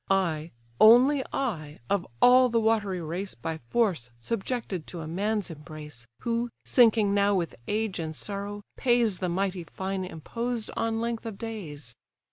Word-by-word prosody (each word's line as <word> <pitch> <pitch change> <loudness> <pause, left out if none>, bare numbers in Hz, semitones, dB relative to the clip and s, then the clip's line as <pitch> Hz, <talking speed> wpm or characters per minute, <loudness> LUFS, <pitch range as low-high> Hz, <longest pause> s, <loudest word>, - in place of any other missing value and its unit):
I, 170 -5 +1 0.3
only 255 +5 +7
I, 160 - -3
of 200 -3 0 0.2
all 255 0 +7
the 230 0 +2
watery 210 -5 +1
race 180 +5 -3
By 160 +7 -4
force 185 - +1
subjected 205 - -3
to 170 - -6
a 155 - -6
man's 205 +3 -1
embrace, 150 -5 -10
Who, 235 +1 -1 0.2
sinking 220 -4 +5
now 200 0 +3
with 175 -3 -1
age 215 -3 -1
and 160 -1 -4
sorrow, 205 +2 -5
pays 240 -6 +2
The 180 - -1
mighty 185 0 -1
fine 190 +3 -4
imposed 230 +7 -4
on 225 0 0
length 230 0 -3
of 215 -3 -6
days. 155 - -7
200 Hz, 150 wpm, -28 LUFS, 170-230 Hz, 0.3 s, only